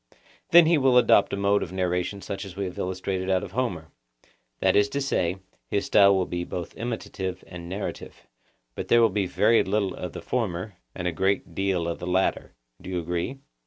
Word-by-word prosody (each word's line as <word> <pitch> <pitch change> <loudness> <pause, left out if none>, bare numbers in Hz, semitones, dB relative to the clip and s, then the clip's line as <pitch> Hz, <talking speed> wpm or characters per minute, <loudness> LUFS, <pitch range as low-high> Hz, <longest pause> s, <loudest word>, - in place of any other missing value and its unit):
Then 170 -1 +8
he 160 -1 +4
will 130 -2 +4
adopt 115 -4 +5
a - - -2
mode 100 +1 +2
of 85 - -5
narration 90 +1 -2
such 95 -1 -5
as 95 -3 -9
we 100 0 -2
have 90 - -6
illustrated 95 0 -3
out 95 0 +2
of 100 - -7
Homer, 95 -9 -3 0.7
that - - +3
is 105 0 +4
to 140 - -2
say, 95 -10 0 0.3
his 100 - 0
style 100 -1 +6
will 95 -1 +1
be 85 0 -3
both 85 -1 -6
imitative 95 -6 -4
and 85 -1 -9
narrative; 100 +2 -6 0.5
but - - -6
there 120 0 +5
will 115 - +5
be 100 -1 0
very 110 +5 +3
little 100 -1 0
of 90 -2 -6
the - - -7
former, 105 -4 -2 0.2
and 90 - -3
a - - +1
great 95 +1 -1
deal 95 -2 0
of 85 - -3
the 90 - -6
latter. 95 -6 0 0.3
Do - - -9
you 90 - -2
agree? 85 +11 -3
95 Hz, 205 wpm, -26 LUFS, 90-105 Hz, 0.7 s, Then